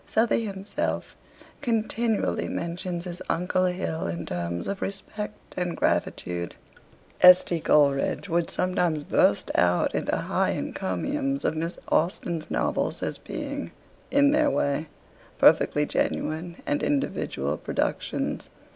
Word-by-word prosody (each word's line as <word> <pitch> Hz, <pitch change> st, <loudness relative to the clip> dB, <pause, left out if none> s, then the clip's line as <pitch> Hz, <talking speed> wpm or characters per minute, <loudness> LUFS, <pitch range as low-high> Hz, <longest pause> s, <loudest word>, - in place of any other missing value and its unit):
Southey 230 Hz, 0 st, +2 dB
himself 195 Hz, 0 st, -3 dB, 0.5 s
continually 230 Hz, -2 st, 0 dB
mentions 170 Hz, +1 st, -3 dB
his 175 Hz, -1 st, -6 dB
uncle 180 Hz, +2 st, +1 dB
Hill 180 Hz, -3 st, -2 dB
in 85 Hz, +1 st, -4 dB
terms 85 Hz, 0 st, -3 dB
of 200 Hz, -, -3 dB
respect 210 Hz, +2 st, -6 dB
and 175 Hz, -2 st, -2 dB
gratitude. 85 Hz, -1 st, -1 dB, 0.7 s
S. 180 Hz, 0 st, +9 dB
T. 170 Hz, -, -2 dB
Coleridge 145 Hz, +3 st, +2 dB
would 170 Hz, -1 st, 0 dB
sometimes 175 Hz, -4 st, 0 dB
burst -, -, +2 dB
out 90 Hz, 0 st, +3 dB
into -, -, 0 dB
high -, -, 0 dB
encomiums 275 Hz, -, -2 dB
of -, -, +1 dB
Miss 165 Hz, +2 st, -3 dB
Austen's 170 Hz, -1 st, 0 dB
novels -, -, -1 dB
as -, -, -3 dB
being, -, -, -5 dB, 0.4 s
'in 285 Hz, 0 st, +5 dB
their 300 Hz, 0 st, +4 dB
way, 140 Hz, -, 0 dB, 0.5 s
perfectly 150 Hz, 0 st, +5 dB
genuine 165 Hz, +4 st, -1 dB
and 290 Hz, -2 st, 0 dB
individual 280 Hz, -1 st, -1 dB
productions.' -, -, -2 dB
180 Hz, 120 wpm, -26 LUFS, 155-210 Hz, 0.7 s, S